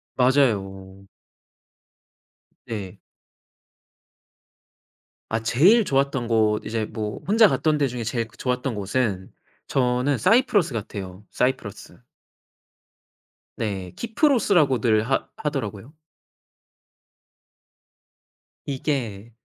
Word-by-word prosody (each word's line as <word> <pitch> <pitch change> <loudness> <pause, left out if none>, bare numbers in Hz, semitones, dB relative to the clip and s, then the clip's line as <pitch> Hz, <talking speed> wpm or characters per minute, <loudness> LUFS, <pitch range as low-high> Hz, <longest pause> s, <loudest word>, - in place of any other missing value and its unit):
맞아요. 95 -8 0 1.6
네. 105 -6 -6 2.3
아 110 0 0
제일 185 - +4
좋았던 135 -3 0
곳 110 -2 +1
이제 110 -1 -2
뭐 105 -1 -5
혼자 220 +2 +6
갔던 155 -5 +1
데 140 -2 +2
중에 120 -2 -5
제일 115 0 -2
그 - - -22
좋았던 125 0 -2
곳은 100 -2 -2 0.4
저는 125 +1 +1
사이프러스 205 - +3
같아요. 100 -3 -6
사이프러스. 125 -5 -3 1.6
네 95 -5 -4
키프로스라고들 175 - +2
하 135 - 0
하더라고요. 130 -4 -4 2.7
이게 120 -6 -3
120 Hz, 185 characters per minute, -23 LUFS, 105-140 Hz, 2.7 s, 혼자